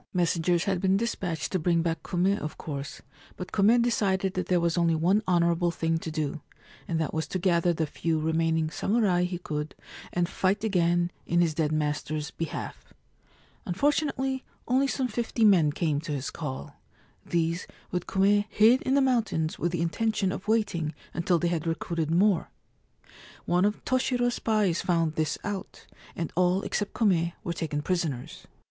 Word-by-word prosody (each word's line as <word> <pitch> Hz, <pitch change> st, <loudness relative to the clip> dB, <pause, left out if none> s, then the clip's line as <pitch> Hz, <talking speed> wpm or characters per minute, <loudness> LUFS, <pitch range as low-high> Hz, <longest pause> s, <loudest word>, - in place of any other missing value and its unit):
Messengers 175 Hz, 0 st, +2 dB
had 190 Hz, -3 st, -1 dB
been 190 Hz, 0 st, +3 dB
despatched 195 Hz, -7 st, -2 dB
to 185 Hz, -, 0 dB
bring 170 Hz, 0 st, +2 dB
back 165 Hz, -1 st, -1 dB
Kume, 185 Hz, +3 st, +1 dB
of 155 Hz, -, -6 dB
course; 140 Hz, -2 st, -6 dB, 0.3 s
but 180 Hz, 0 st, -7 dB
Kume 220 Hz, +4 st, +4 dB
decided 195 Hz, -5 st, +1 dB
that 185 Hz, -, -2 dB
there 180 Hz, -1 st, +3 dB
was 170 Hz, -1 st, +1 dB
only 170 Hz, -2 st, +2 dB
one 180 Hz, +7 st, +3 dB
honourable 170 Hz, -1 st, +2 dB
thing 165 Hz, -1 st, -1 dB
to 165 Hz, -, -5 dB
do, 155 Hz, -1 st, -3 dB, 0.5 s
and 165 Hz, -2 st, -1 dB
that 160 Hz, -, -2 dB
was 160 Hz, 0 st, -2 dB
to -, -, -2 dB
gather 175 Hz, -1 st, +2 dB
the 160 Hz, -1 st, 0 dB
few 160 Hz, +2 st, -1 dB
remaining 160 Hz, 0 st, +1 dB
samurai 195 Hz, -5 st, +1 dB
he 180 Hz, 0 st, -3 dB
could 150 Hz, -3 st, -4 dB, 0.4 s
and 175 Hz, -1 st, 0 dB
fight 190 Hz, +3 st, 0 dB
again 175 Hz, -4 st, +2 dB, 0.2 s
in 170 Hz, -, +2 dB
his 170 Hz, -2 st, +3 dB
dead 155 Hz, -1 st, 0 dB
master's 150 Hz, 0 st, -2 dB
behalf. 165 Hz, -2 st, -6 dB, 0.7 s
Unfortunately, 270 Hz, -, 0 dB, 0.2 s
only 265 Hz, +3 st, +3 dB
some 265 Hz, -1 st, -1 dB
fifty 230 Hz, 0 st, 0 dB
men 175 Hz, -8 st, +5 dB
came 150 Hz, -2 st, -1 dB
to 160 Hz, -2 st, -4 dB
his 135 Hz, -2 st, -3 dB
call. 65 Hz, +2 st, -6 dB, 0.5 s
These, 170 Hz, +1 st, -1 dB, 0.2 s
with 180 Hz, -1 st, -2 dB
Kume, 205 Hz, +2 st, +3 dB
hid 230 Hz, +5 st, +5 dB
in 265 Hz, -, +1 dB
the 280 Hz, -, +4 dB
mountains 225 Hz, -12 st, 0 dB
with 175 Hz, -, 0 dB
the 170 Hz, -1 st, -1 dB
intention 195 Hz, +3 st, 0 dB
of 195 Hz, -, -6 dB
waiting 200 Hz, -8 st, 0 dB, 0.2 s
until 175 Hz, +1 st, +1 dB
they 175 Hz, +1 st, 0 dB
had 170 Hz, -1 st, -2 dB
recruited 165 Hz, -1 st, -2 dB
more. 180 Hz, +1 st, +3 dB, 1.0 s
One 180 Hz, +2 st, +2 dB
of 210 Hz, +1 st, -1 dB
Toshiro's 250 Hz, -1 st, +1 dB
spies 210 Hz, -7 st, +1 dB
found 165 Hz, -3 st, +1 dB
this 155 Hz, -1 st, -1 dB
out, 205 Hz, -2 st, -6 dB, 0.3 s
and 165 Hz, -2 st, -4 dB
all 180 Hz, +2 st, +2 dB
except 205 Hz, -1 st, -2 dB
Kume 175 Hz, -6 st, +2 dB
were 170 Hz, -, -2 dB
taken 155 Hz, -3 st, -3 dB
prisoners. 160 Hz, -9 st, -3 dB
175 Hz, 170 wpm, -27 LUFS, 160-200 Hz, 1.0 s, men